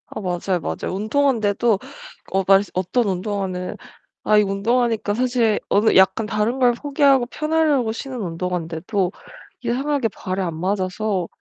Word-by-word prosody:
아 -, -, -6 dB
맞아요, 180 Hz, -1 st, -1 dB
맞아요. 80 Hz, -, -4 dB
운동화인데도 220 Hz, -1 st, +1 dB, 0.5 s
어 195 Hz, 0 st, +2 dB
말 195 Hz, +1 st, +6 dB
어떤 195 Hz, +6 st, 0 dB
운동화는 185 Hz, -1 st, -3 dB, 0.5 s
아 215 Hz, -, +4 dB
이 -, -, +7 dB
운동화니까 220 Hz, +2 st, 0 dB
사실 240 Hz, -3 st, +1 dB
어느 210 Hz, +2 st, +3 dB
약간 190 Hz, +3 st, +4 dB
다른걸 235 Hz, +4 st, +2 dB
포기하고 275 Hz, 0 st, +2 dB
편하려고 305 Hz, -5 st, +1 dB
신는 255 Hz, +2 st, -6 dB
운동화인데도 180 Hz, +1 st, -2 dB, 0.5 s
이상하게 260 Hz, +1 st, 0 dB
발에 185 Hz, -2 st, -4 dB
안 170 Hz, -3 st, -3 dB
맞아서 190 Hz, 0 st, -1 dB
210 Hz, 330 characters per minute, -21 LUFS, 185-245 Hz, 0.5 s, 이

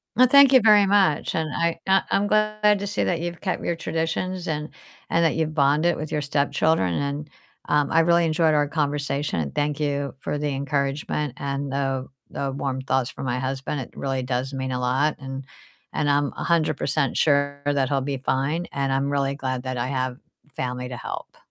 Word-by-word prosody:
Well, 255 Hz, +1 st, +6 dB
thank 280 Hz, 0 st, +7 dB
you 260 Hz, -2 st, +7 dB
very 210 Hz, -2 st, +6 dB
much 195 Hz, -7 st, +2 dB
and 160 Hz, -2 st, -1 dB
I 170 Hz, 0 st, 0 dB
I 190 Hz, 0 st, +5 dB
I'm 200 Hz, -, +2 dB
glad 215 Hz, -1 st, +3 dB
to 200 Hz, -, -4 dB
see 205 Hz, -, -1 dB
that 175 Hz, -, 0 dB
you've 175 Hz, -1 st, -4 dB
kept 190 Hz, -, -2 dB
your 170 Hz, -, 0 dB
traditions 165 Hz, +3 st, -2 dB
and 150 Hz, 0 st, -2 dB, 0.4 s
and 170 Hz, -, +3 dB
that 160 Hz, -, +2 dB
you've 160 Hz, -1 st, -1 dB
bonded 150 Hz, +4 st, +3 dB
with 155 Hz, 0 st, -6 dB
your 150 Hz, -, 0 dB
stepchildren 145 Hz, -, +1 dB
and, 145 Hz, +1 st, -3 dB, 0.4 s
um, 150 Hz, -1 st, +2 dB
I 165 Hz, -, +4 dB
really 170 Hz, +1 st, +4 dB
enjoyed 160 Hz, 0 st, +2 dB
our 145 Hz, -1 st, +2 dB
conversation, 145 Hz, -, -1 dB
and 70 Hz, -3 st, -5 dB
thank 145 Hz, 0 st, 0 dB
you 140 Hz, -2 st, -1 dB
for 145 Hz, -, -3 dB
the 150 Hz, -, -2 dB
encouragement 140 Hz, 0 st, -2 dB
and 140 Hz, 0 st, -3 dB
the 135 Hz, -1 st, -1 dB, 0.2 s
the 140 Hz, -1 st, -3 dB
warm 135 Hz, -1 st, -2 dB
thoughts 130 Hz, -1 st, 0 dB
for -, -, -8 dB
my 125 Hz, -1 st, -1 dB
husband 135 Hz, +2 st, -3 dB
it -, -, -8 dB
really 135 Hz, -1 st, -2 dB
does 130 Hz, +1 st, -2 dB
mean 130 Hz, -1 st, -3 dB
a 125 Hz, -, -2 dB
lot 130 Hz, +5 st, +1 dB
and 135 Hz, 0 st, -7 dB, 0.5 s
and 145 Hz, -, 0 dB
I'm 145 Hz, 0 st, +2 dB
100% 155 Hz, -4 st, 0 dB
sure 140 Hz, -1 st, +2 dB
that 140 Hz, -2 st, +1 dB
he'll 140 Hz, -1 st, +1 dB
be 135 Hz, +1 st, -2 dB
fine, 140 Hz, +6 st, -1 dB
and 140 Hz, -1 st, -1 dB
I'm 135 Hz, +1 st, 0 dB
really 140 Hz, -1 st, 0 dB
glad 130 Hz, -2 st, -3 dB
that 130 Hz, -1 st, -3 dB
I 120 Hz, +1 st, -1 dB
have 130 Hz, -2 st, -2 dB, 0.4 s
family 125 Hz, -1 st, -3 dB
to 125 Hz, -, -6 dB
help. -, -, -7 dB
145 Hz, 200 wpm, -24 LUFS, 135-160 Hz, 0.5 s, thank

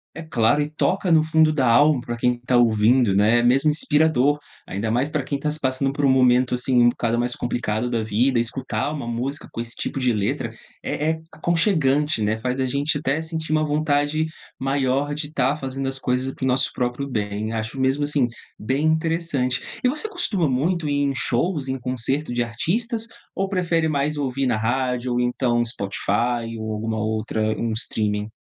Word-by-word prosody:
É 165 Hz, -, -6 dB
claro, 140 Hz, -2 st, +2 dB
e 145 Hz, -, -2 dB
toca 180 Hz, +4 st, 0 dB
no 160 Hz, -1 st, +5 dB
fundo 160 Hz, 0 st, +3 dB
da 135 Hz, -5 st, +1 dB
alma 145 Hz, +4 st, +5 dB
para 120 Hz, 0 st, -4 dB
quem 125 Hz, +1 st, +1 dB
está 125 Hz, +1 st, -1 dB
ouvindo, 115 Hz, -1 st, +4 dB
né, 105 Hz, +4 st, +4 dB
é -, -, +1 dB
mesmo 135 Hz, +5 st, +4 dB
inspirador, 150 Hz, -2 st, +2 dB, 0.3 s
ainda 105 Hz, +4 st, -2 dB
mais 125 Hz, +5 st, +1 dB
para 150 Hz, -2 st, -1 dB
quem 140 Hz, +1 st, -2 dB
está 150 Hz, +2 st, -1 dB
se 155 Hz, -, -2 dB
passando 135 Hz, 0 st, 0 dB
por 145 Hz, +1 st, -1 dB
um -, -, +4 dB
momento, 125 Hz, -1 st, +4 dB
assim, 125 Hz, 0 st, +2 dB
um 120 Hz, -, +6 dB
bocado 120 Hz, -1 st, -1 dB
mais 120 Hz, +1 st, 0 dB
complicado 120 Hz, -1 st, -2 dB
da 115 Hz, -2 st, -1 dB
vida, 120 Hz, +4 st, +1 dB
escutar 120 Hz, +2 st, -2 dB
uma 140 Hz, -6 st, -5 dB
música 125 Hz, +5 st, -3 dB
com -, -, -7 dB
esse 115 Hz, 0 st, -5 dB
tipo 135 Hz, -, -3 dB
de 125 Hz, -2 st, +2 dB
letra 105 Hz, -2 st, -1 dB, 0.3 s
é -, -, -3 dB, 0.2 s
é 160 Hz, 0 st, -1 dB
aconchegante, 155 Hz, -, +1 dB
né. 110 Hz, +1 st, +1 dB
Faz 125 Hz, +3 st, -2 dB
a 130 Hz, -, +1 dB
gente 140 Hz, +3 st, 0 dB
até 140 Hz, +1 st, 0 dB
sentir 160 Hz, -1 st, -5 dB
uma 155 Hz, 0 st, +2 dB
vontade 150 Hz, 0 st, +1 dB, 0.3 s
maior 135 Hz, +1 st, 0 dB
de 150 Hz, 0 st, -3 dB
estar 140 Hz, -1 st, +1 dB
fazendo 135 Hz, -1 st, -4 dB
as 135 Hz, -, -2 dB
coisas 130 Hz, 0 st, -1 dB
para -, -, -8 dB
o -, -, +2 dB
nosso 130 Hz, +1 st, +2 dB
próprio 125 Hz, +2 st, -2 dB
bem. 105 Hz, -2 st, -2 dB
Acho 110 Hz, +3 st, -4 dB
mesmo 135 Hz, +2 st, +1 dB
assim, 145 Hz, -3 st, +1 dB, 0.3 s
bem 130 Hz, +7 st, -1 dB
interessante. 160 Hz, -5 st, 0 dB, 0.2 s
E 250 Hz, -, +4 dB
você 300 Hz, +11 st, 0 dB
costuma 220 Hz, -, +1 dB
muito 155 Hz, +5 st, 0 dB
ir 145 Hz, -, 0 dB
em 140 Hz, -, 0 dB
shows, 140 Hz, +4 st, 0 dB
em 130 Hz, 0 st, -2 dB
concerto 125 Hz, +3 st, -2 dB
de 120 Hz, 0 st, +1 dB
artistas 225 Hz, -, -1 dB, 0.3 s
ou 195 Hz, 0 st, -1 dB
prefere 170 Hz, -4 st, +1 dB
mais 150 Hz, 0 st, 0 dB
ouvir 135 Hz, -2 st, -1 dB
na 120 Hz, -3 st, +1 dB
rádio, 125 Hz, +2 st, -1 dB
ou, 120 Hz, -, +1 dB
então, 120 Hz, -1 st, +1 dB
Spotify 115 Hz, +2 st, -2 dB
,ou 110 Hz, 0 st, -4 dB
alguma 110 Hz, +1 st, -2 dB
outra 110 Hz, 0 st, -2 dB, 0.2 s
um 115 Hz, -1 st, -1 dB
streaming? 105 Hz, -2 st, -2 dB
130 Hz, 195 wpm, -23 LUFS, 120-150 Hz, 0.3 s, um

